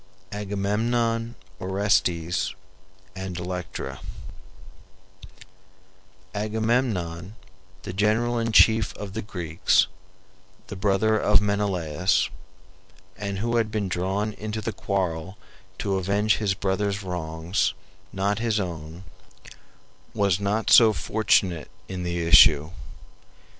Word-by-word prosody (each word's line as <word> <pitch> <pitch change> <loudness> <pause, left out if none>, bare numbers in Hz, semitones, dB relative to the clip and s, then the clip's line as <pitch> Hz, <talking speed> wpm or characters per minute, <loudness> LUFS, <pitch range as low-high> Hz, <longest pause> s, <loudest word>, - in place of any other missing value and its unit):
AGAMEMNON, 115 +4 -1 0.2
ORESTES, 90 -2 0 0.6
AND 95 -2 -5
ELECTRA 90 0 -5 2.3
Agamemnon, 105 -4 -1 0.5
the - - -6
general 110 +4 +1
in 115 0 -1
chief 110 0 +5
of 100 -2 -7
the 110 - -3
Greeks, 85 -6 +1 0.8
the - - -6
brother 100 +3 +2
of 105 -1 +4
Menelaus, 95 -5 0 0.8
and 100 -1 -4
who 115 +3 0
had 115 -2 +1
been 105 -2 -2
drawn 95 +4 -1
into 110 +1 -5
the 110 0 -4
quarrel 95 -2 -2 0.4
to 95 -1 -1
avenge 100 +3 +1
his 100 -2 0
brother's 100 +1 -1
wrongs, 85 +1 -2 0.4
not 100 +2 -1
his 115 -2 0
own, 85 -1 -6 1.1
was 100 -3 +2
not 105 +2 0
so 110 -2 +8
fortunate 95 -8 +1 0.2
in 95 -1 -5
the 85 -1 -2
issue. 75 -1 +6
100 Hz, 100 wpm, -25 LUFS, 90-110 Hz, 2.3 s, so